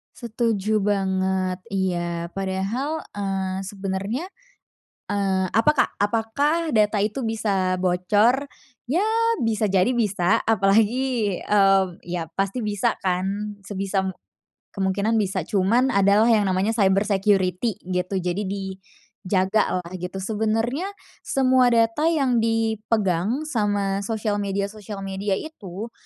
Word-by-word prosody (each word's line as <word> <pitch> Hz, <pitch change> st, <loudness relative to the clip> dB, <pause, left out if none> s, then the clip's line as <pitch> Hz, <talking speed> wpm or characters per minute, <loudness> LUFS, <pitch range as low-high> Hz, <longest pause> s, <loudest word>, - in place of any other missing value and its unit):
Setuju 220 Hz, -3 st, -1 dB
banget, 190 Hz, -2 st, 0 dB, 0.2 s
iya. 175 Hz, -3 st, -1 dB
Padahal, 195 Hz, -, -2 dB, 0.2 s
eee, 190 Hz, -1 st, -2 dB
sebenernya, 195 Hz, -, -4 dB, 0.8 s
eee, 190 Hz, -2 st, 0 dB
apa 230 Hz, +7 st, +4 dB
Kak? -, -, +3 dB
Apakah 280 Hz, +10 st, 0 dB
data 215 Hz, -2 st, +3 dB
itu 225 Hz, +3 st, -2 dB
bisa 200 Hz, -4 st, 0 dB
bocor? 205 Hz, +9 st, +2 dB, 0.4 s
Ya, 340 Hz, +10 st, +1 dB, 0.4 s
bisa 220 Hz, -1 st, +1 dB
jadi 195 Hz, +5 st, +2 dB
bisa, 210 Hz, -3 st, +1 dB
apalagi, 220 Hz, +1 st, +2 dB
eee, 195 Hz, -2 st, +4 dB, 0.2 s
ya 170 Hz, -2 st, -4 dB
pasti 195 Hz, +5 st, -1 dB
bisa 210 Hz, +2 st, 0 dB
kan, 195 Hz, +3 st, -2 dB
sebisa 195 Hz, -1 st, -1 dB, 0.6 s
kemungkinan 200 Hz, +3 st, 0 dB
bisa, 190 Hz, -4 st, -1 dB
cuman 220 Hz, +9 st, +2 dB
adalah 200 Hz, +4 st, +4 dB
yang 210 Hz, -3 st, +3 dB
namanya 190 Hz, +4 st, +1 dB
cyber 195 Hz, -3 st, +3 dB
security 195 Hz, 0 st, +1 dB
gitu. 180 Hz, +1 st, -2 dB
Jadi 185 Hz, +3 st, -2 dB
dijaga 190 Hz, 0 st, -2 dB
lah 170 Hz, -, -11 dB
gitu. 185 Hz, +2 st, -5 dB
Sebenernya 225 Hz, -, -1 dB, 0.3 s
semua 260 Hz, -1 st, +3 dB
data 235 Hz, +6 st, +2 dB
yang 275 Hz, -7 st, +2 dB
dipegang 220 Hz, -, 0 dB
sama 205 Hz, -8 st, 0 dB
sosial 210 Hz, 0 st, -2 dB
media-sosial 200 Hz, 0 st, -4 dB
media 195 Hz, 0 st, -2 dB
itu, 220 Hz, -, -7 dB
205 Hz, 110 wpm, -23 LUFS, 190-225 Hz, 0.8 s, apa